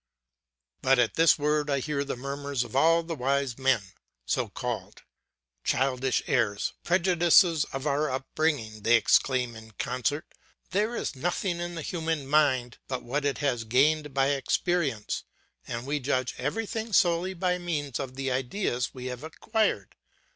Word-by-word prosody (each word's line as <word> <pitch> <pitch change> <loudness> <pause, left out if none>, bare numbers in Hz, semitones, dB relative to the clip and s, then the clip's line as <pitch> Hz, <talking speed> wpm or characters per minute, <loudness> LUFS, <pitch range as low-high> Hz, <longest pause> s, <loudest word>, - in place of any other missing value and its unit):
But 135 0 +4
at 120 -2 +2
this 165 0 +5
word 150 0 +1
I 140 - +2
hear 140 +1 -1
the 140 - -4
murmurs 140 0 -3
of 120 - -10
all 165 +4 +4
the 165 0 -4
wise 135 -2 -1
men 130 -5 +3 0.4
so - - 0
called. - - -5 0.6
Childish 130 -1 +1
errors, 105 -4 0
prejudices 175 -2 +4
of 135 +1 -6
our 150 +1 +1
upbringing, 130 -4 -1
they 115 +3 +5
exclaim 125 +1 +2
in 110 0 -12
concert! 145 +4 -1 0.5
There 210 +5 +1
is - - -3
nothing 175 +4 -1
in 175 0 -4
the 165 - -5
human 160 -4 -2
mind 135 -4 +2
but 130 -1 -4
what 140 +4 -2
it 140 - 0
has 120 -5 0
gained 145 +6 +2
by 135 0 +2
experience; 140 - 0 0.4
and 120 +1 -4
we 145 +2 -1
judge 130 -2 -1
everything 220 - -3
solely 180 +1 +3
by 180 0 0
means 150 -7 -3
of 130 -1 -5
the 135 0 -2
ideas 125 -1 -1
we 125 -1 -7
have 125 0 -5
acquired. 195 - -1
140 Hz, 155 wpm, -28 LUFS, 130-165 Hz, 0.6 s, this